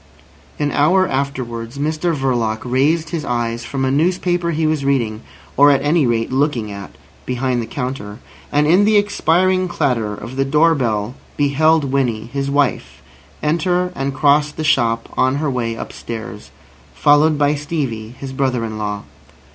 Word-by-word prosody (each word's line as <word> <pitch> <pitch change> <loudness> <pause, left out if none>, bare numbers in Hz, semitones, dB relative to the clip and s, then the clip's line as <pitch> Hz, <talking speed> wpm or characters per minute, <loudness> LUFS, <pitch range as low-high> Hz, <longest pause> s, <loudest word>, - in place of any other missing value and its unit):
An 145 -1 -1
hour 185 +6 +3
afterwards 130 -3 -3
Mr 155 +3 -1
Verloc 120 -5 -1
raised 150 +6 +1
his 165 -3 -3
eyes 120 -2 -2
from 135 +2 -2
a 130 - +1
newspaper 175 +3 +1
he 160 -1 0
was 155 -2 0
reading, 120 -6 0 0.3
or 145 +2 +6
at 140 -2 +3
any 150 -1 +2
rate 115 0 0
looking 130 -6 0
at, 100 -1 -9 0.3
behind 125 -1 -1
the 115 - -6
counter, 125 -6 -5 0.3
and 145 +1 +2
in 180 +6 +5
the 210 0 +4
expiring 185 -2 +2
clatter 115 -10 -1
of 115 +6 -9
the 135 - +2
door 155 +4 +3
bell 115 -5 -1 0.2
beheld 155 +2 +3
Winnie, 120 -6 0
his 140 0 -2
wife, 140 -1 -1 0.4
enter 180 +3 +1
and 135 0 -3
cross 145 +1 +3
the 155 - -5
shop 115 -6 +1
on 130 +1 +2
her 145 0 -1
way 115 -3 -2
upstairs, 110 -8 -7 0.5
followed 150 +1 +4
by 145 0 +2
Stevie, 135 -7 -4
his 135 -1 -7
brother 130 -3 0
in 110 -1 -6
law. 105 -1 -3
140 Hz, 160 wpm, -18 LUFS, 120-155 Hz, 0.5 s, or